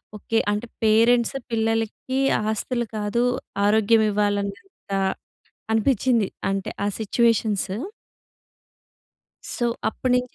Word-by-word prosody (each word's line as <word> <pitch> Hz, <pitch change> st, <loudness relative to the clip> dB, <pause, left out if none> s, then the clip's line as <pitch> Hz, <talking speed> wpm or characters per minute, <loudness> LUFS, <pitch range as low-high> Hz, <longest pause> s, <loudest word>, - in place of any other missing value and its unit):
Okay. 225 Hz, +2 st, -2 dB
అంటే 210 Hz, +3 st, -2 dB, 0.2 s
parents 230 Hz, +3 st, +4 dB, 0.2 s
పిల్లలకి 225 Hz, +3 st, -1 dB, 0.3 s
ఆస్తులు 235 Hz, +2 st, -1 dB
కాదు 210 Hz, +3 st, 0 dB, 0.4 s
ఆరోగ్యం 220 Hz, +1 st, +4 dB
ఇవ్వాలన్నంత 205 Hz, -, -2 dB, 0.8 s
అనిపిచింది. 230 Hz, -2 st, +2 dB, 0.2 s
అంటే 195 Hz, -1 st, -2 dB, 0.2 s
ఆ -, -, +2 dB
సిట్యుయేషన్స్. 220 Hz, -2 st, +1 dB, 1.9 s
సో 240 Hz, -, 0 dB, 0.2 s
అప్పడినుంచి 250 Hz, +1 st, -1 dB
225 Hz, 80 wpm, -23 LUFS, 210-240 Hz, 1.9 s, parents